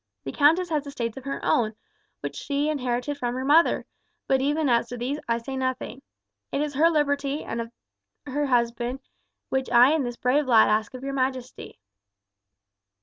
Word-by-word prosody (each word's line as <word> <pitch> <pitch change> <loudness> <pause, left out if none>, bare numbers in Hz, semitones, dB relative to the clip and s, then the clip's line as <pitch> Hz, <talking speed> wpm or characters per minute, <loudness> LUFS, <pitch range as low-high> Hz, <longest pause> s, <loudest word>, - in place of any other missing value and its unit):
The 135 - -5
countess 330 - +3
has 295 -2 -1
estates 235 -5 -4
of 265 - -9
her 275 - -3
own, 220 -2 +1 0.5
which - - -5
she 285 +1 -1
inherited 265 0 -2
from 245 -1 -2
her 260 +1 -3
mother, 315 +4 +4 0.4
but 265 -1 +2
even 295 +2 +1
as 235 -2 +2
to 245 - -6
these 260 +5 -3
I 230 - +2
say 265 +3 -6
nothing. 260 0 -3 0.5
It - - -1
is 295 0 -1
her 315 +5 +4
liberty 285 -2 0
and 230 - -4
that 230 0 -5 0.5
of 270 - -8
her 290 0 0
husband 240 +1 0 0.5
which 265 -1 -1
I 245 +3 +6
and 315 -2 +1
this 240 -1 -4
brave 270 +3 +1
lad 225 -3 +6
ask 215 +3 0
of 255 - -9
your 275 0 -3
majesty." 260 -1 -3
265 Hz, 185 wpm, -25 LUFS, 240-285 Hz, 0.5 s, I